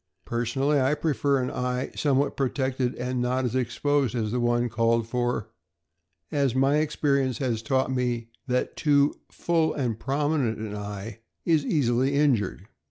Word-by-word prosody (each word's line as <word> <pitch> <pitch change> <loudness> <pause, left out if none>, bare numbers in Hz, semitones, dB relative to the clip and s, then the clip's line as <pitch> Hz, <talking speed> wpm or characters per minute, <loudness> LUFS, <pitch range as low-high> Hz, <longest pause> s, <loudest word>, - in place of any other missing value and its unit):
Personally, 135 +5 +1
I 135 +3 +2
prefer 145 -3 +1
an 125 - -2
eye 125 +1 -2
somewhat 140 -1 +1
protected 130 -2 -1
and 125 0 -2
not 125 +1 0
as 120 - -2
exposed 130 +1 0
as 110 -3 -1
the 125 - 0
one 120 0 +2
called 115 0 +1
for, 120 -2 -1 0.8
as 140 -5 +1
my 135 +2 +3
experience 140 -4 +1
has 120 -5 -1
taught 130 +3 0
me 120 -2 -1 0.2
that 125 0 -1
too 145 -1 +3 0.2
"full 165 -2 +1
and 120 -6 -2
prominent" 140 -3 0
an 110 -1 -5
eye 105 +1 -6 0.3
is 160 -3 +3
easily 130 -2 +1
injured. 115 -10 +1
125 Hz, 150 wpm, -26 LUFS, 120-140 Hz, 0.8 s, my